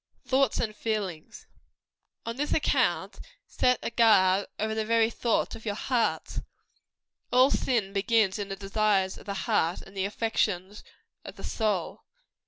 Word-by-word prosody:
THOUGHTS 270 Hz, 0 st, +2 dB
AND 215 Hz, -2 st, -2 dB
FEELINGS. 205 Hz, -8 st, -4 dB, 0.8 s
On 230 Hz, 0 st, -4 dB
this 295 Hz, +3 st, -1 dB
account, 305 Hz, -, +1 dB, 0.3 s
set 250 Hz, -1 st, +1 dB
a -, -, -3 dB
guard 200 Hz, -4 st, +4 dB
over 220 Hz, +1 st, -1 dB
the 220 Hz, 0 st, -1 dB
very 230 Hz, +1 st, +2 dB
thoughts 235 Hz, 0 st, 0 dB
of 225 Hz, -, -12 dB
your 205 Hz, -2 st, -2 dB
hearts. 240 Hz, +1 st, -1 dB, 0.9 s
All 255 Hz, +3 st, +5 dB
sin 220 Hz, -7 st, 0 dB
begins 210 Hz, 0 st, +2 dB
in 200 Hz, -1 st, -4 dB
the 195 Hz, -, -3 dB
desires 195 Hz, -1 st, 0 dB
of -, -, -16 dB
the 200 Hz, -, -3 dB
heart 165 Hz, +2 st, +1 dB
and 195 Hz, -, -15 dB
the 190 Hz, 0 st, -1 dB
affections 205 Hz, -2 st, -1 dB, 0.4 s
of -, -, -9 dB
the -, -, -11 dB
soul. 210 Hz, -6 st, -2 dB
215 Hz, 150 wpm, -28 LUFS, 195-230 Hz, 0.9 s, All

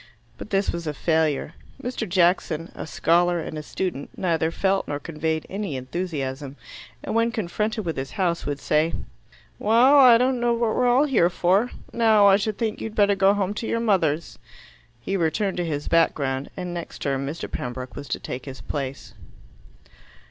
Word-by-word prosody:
But -, -, -8 dB
this 195 Hz, -1 st, +1 dB
was 170 Hz, -1 st, -5 dB
a 150 Hz, -, -3 dB
failure. 160 Hz, -2 st, 0 dB, 0.3 s
Mr. 245 Hz, -5 st, -4 dB
Jackson, 170 Hz, -2 st, +1 dB
a -, -, -7 dB
scholar 175 Hz, +2 st, +2 dB
and 155 Hz, -, -5 dB
a 155 Hz, -, -4 dB
student, 150 Hz, -2 st, -4 dB
neither 165 Hz, -3 st, +1 dB
felt 195 Hz, +3 st, 0 dB
nor 145 Hz, 0 st, -3 dB
conveyed 160 Hz, +1 st, -3 dB
any 195 Hz, -6 st, -4 dB
enthusiasm, 135 Hz, -1 st, -4 dB, 0.5 s
and -, -, -4 dB
when 230 Hz, +1 st, +2 dB
confronted 215 Hz, +1 st, -2 dB
with 165 Hz, -, -3 dB
his 135 Hz, 0 st, -5 dB
House, 175 Hz, -3 st, 0 dB
would 145 Hz, -1 st, -2 dB
say, 155 Hz, +3 st, +1 dB, 0.6 s
"Well, 245 Hz, +7 st, +5 dB
I 250 Hz, -4 st, +8 dB
don't 250 Hz, +1 st, +1 dB
know 240 Hz, 0 st, +2 dB
what 230 Hz, -2 st, 0 dB
we're 250 Hz, -, +2 dB
all 255 Hz, +4 st, +4 dB
here 230 Hz, -, +3 dB
for. 190 Hz, +6 st, +2 dB, 0.2 s
Now 220 Hz, -3 st, +5 dB
I 195 Hz, -1 st, +7 dB
should 210 Hz, 0 st, -2 dB
think 220 Hz, -2 st, -2 dB
you'd 220 Hz, -1 st, -5 dB
better 205 Hz, -1 st, +4 dB
go 195 Hz, +1 st, +4 dB
home 200 Hz, -1 st, -1 dB
to 225 Hz, -, -4 dB
your 230 Hz, -, 0 dB
mothers." 170 Hz, -8 st, 0 dB, 0.6 s
He 195 Hz, +11 st, -3 dB
returned 190 Hz, +3 st, 0 dB
to 175 Hz, -, -1 dB
his 145 Hz, -3 st, -3 dB
background, 140 Hz, -5 st, +1 dB
and 180 Hz, -1 st, -4 dB
next 170 Hz, -1 st, -7 dB
term 135 Hz, -1 st, -1 dB
Mr. 155 Hz, +4 st, -5 dB
Pembroke 125 Hz, +1 st, -6 dB
was 140 Hz, -, -7 dB
to -, -, -3 dB
take 125 Hz, +1 st, -6 dB
his 135 Hz, -1 st, -8 dB
place. 135 Hz, -2 st, -5 dB
175 Hz, 180 wpm, -24 LUFS, 150-215 Hz, 0.6 s, I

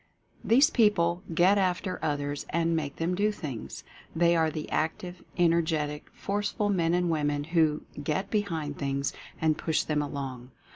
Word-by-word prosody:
These 275 Hz, +8 st, +5 dB
people 180 Hz, -6 st, +3 dB
"get 180 Hz, +5 st, +4 dB
after" 185 Hz, 0 st, 0 dB
others 145 Hz, -1 st, -2 dB
and 165 Hz, 0 st, +1 dB
make 145 Hz, -3 st, -2 dB
them 165 Hz, +2 st, -1 dB
do 205 Hz, +3 st, +2 dB
things. 145 Hz, -, -7 dB, 0.3 s
They 170 Hz, +1 st, +4 dB
are 160 Hz, -1 st, +3 dB
the 155 Hz, 0 st, -5 dB
active, 175 Hz, +3 st, -2 dB
energetic, 160 Hz, -4 st, +1 dB
forceful 205 Hz, +1 st, -2 dB
men 170 Hz, -4 st, +2 dB
and 180 Hz, -1 st, +1 dB
women 145 Hz, -2 st, 0 dB
who 160 Hz, -1 st, +2 dB, 0.2 s
"get 175 Hz, +7 st, -2 dB
behind 165 Hz, -9 st, -2 dB
things" 140 Hz, 0 st, -1 dB, 0.3 s
and 155 Hz, -1 st, +1 dB
push 160 Hz, -2 st, +1 dB
them 150 Hz, -1 st, 0 dB
along. 135 Hz, -4 st, -5 dB
165 Hz, 150 wpm, -28 LUFS, 150-180 Hz, 0.3 s, These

